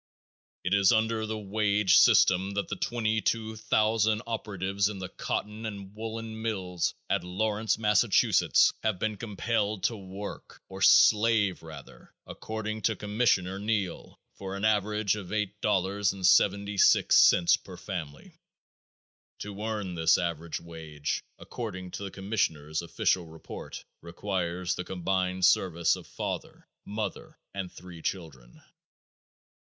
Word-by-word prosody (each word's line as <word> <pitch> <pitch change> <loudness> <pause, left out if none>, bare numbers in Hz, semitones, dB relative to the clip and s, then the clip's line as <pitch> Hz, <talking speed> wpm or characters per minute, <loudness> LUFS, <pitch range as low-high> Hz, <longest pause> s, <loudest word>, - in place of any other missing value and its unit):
It 90 - 0
is 100 0 +5
under 110 -1 +1
the 110 0 -3
wage 105 -1 +2
system 95 +2 +5
that 100 - -2
the - - -2
22,000 110 -1 0
operatives 100 -3 -1
in 105 - -6
the 95 0 -6
cotton 105 +3 -4
and 100 -2 -8
woolen 110 0 -6
mills 95 -6 -2
at 100 -3 0
Lawrence, 105 +4 -1
Massachusetts, 105 -2 +3
have 110 -4 0
been 110 +3 -2
compelled 105 -1 -2
to 115 - +1
work, 100 0 -9
or 95 0 -9
slave 105 -2 +5
rather, 80 -4 -13
according 110 0 -5
to 110 +1 +1
Commissioner 105 -2 0
Neill, 105 -4 -3
for 95 0 -7
an 100 +2 -2
average 105 -1 +1
of 100 -4 -7
$8.76 100 -2 +3
per 90 -2 -11
family. 80 -8 -7 1.0
To 100 0 -7
earn 105 -4 -3
this 80 -1 +3
average 85 -1 -3
wage, 80 -3 -5
according 95 -6 -7
to 100 - -6
the 100 - -4
commissioner's 85 -7 -2
official 85 +1 0
report, 80 0 -9 0.2
requires 90 0 -3
the 90 - -4
combined 95 0 -1
service 85 -3 +3
of - - -11
father, - - -6 0.2
mother 105 +1 -5 0.2
and 95 -2 -5
three 85 -2 -11
children. 75 -10 -6
100 Hz, 120 wpm, -28 LUFS, 90-110 Hz, 1.0 s, is